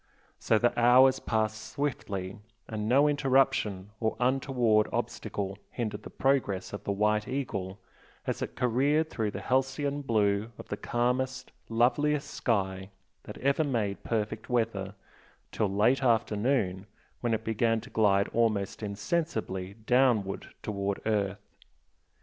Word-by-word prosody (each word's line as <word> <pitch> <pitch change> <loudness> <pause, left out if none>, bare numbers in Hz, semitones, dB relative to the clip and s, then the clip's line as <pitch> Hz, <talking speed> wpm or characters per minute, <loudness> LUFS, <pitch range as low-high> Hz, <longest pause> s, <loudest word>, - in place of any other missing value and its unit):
So 110 - +3
the 120 +2 +2
hours 125 +2 +6
passed 110 -1 -2
swiftly, 100 -9 -3 0.3
and 110 -1 -3
no 140 +4 +5
interruption 130 -9 +1
or 110 -1 0
untoward 125 -4 +2
obstacle 100 -1 -3
hindered 110 -3 -4
the - - -9
progress 125 -10 0
of 100 0 -6
the - - 0
"White 105 +1 +1
Eagle" 105 -8 -3 0.5
as - - -2
it - - -4
careered 140 +6 +2
through 110 -2 -1
the - - -6
halcyon 135 +2 0
blue 105 -3 +1
of - - -11
the - - -2
calmest, 130 +3 -1 0.2
loveliest 140 +6 +2
sky 95 -4 -1 0.4
that - - -8
ever 140 +4 +2
made 115 -8 -1
perfect 110 -1 -2
weather, 110 -5 -1 0.6
till 105 - 0
late 110 +7 +3
afternoon 110 -4 +1 0.3
when 120 -2 +1
it 110 - -5
began 115 +1 +1
to - - -13
glide 100 -2 +3
almost 110 -4 0
insensibly 100 - -2
downward 120 -6 +2 0.2
towards 100 -1 -2
earth. 105 -2 -2
110 Hz, 130 wpm, -29 LUFS, 100-130 Hz, 0.6 s, hours